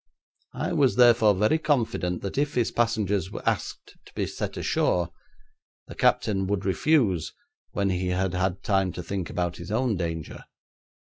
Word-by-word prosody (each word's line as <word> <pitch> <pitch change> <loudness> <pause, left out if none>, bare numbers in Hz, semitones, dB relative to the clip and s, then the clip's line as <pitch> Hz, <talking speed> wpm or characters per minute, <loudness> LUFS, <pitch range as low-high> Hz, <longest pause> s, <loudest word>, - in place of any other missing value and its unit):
I - - -2
was 135 -3 +3
therefore 115 -4 +6
very 105 +12 +2
confident 115 - 0
that 100 - -4
if 145 +1 0
his 120 -2 +1
passengers 105 -6 0 0.2
asked - - -3
to - - -17
be - - -1
set - - -5
ashore, 85 -1 +1 0.8
the - - -10
captain 95 -2 +1
would 100 0 -1
refuse 100 - +2 0.4
when 100 -1 0
he 90 0 -1
had 90 +1 0
had 95 +1 -1
time 95 -2 +1
to 90 - -6
think 95 0 -4
about 90 -1 -2
his - - -9
own 115 -1 +1
danger. 80 -3 -5
100 Hz, 155 wpm, -26 LUFS, 90-115 Hz, 0.8 s, therefore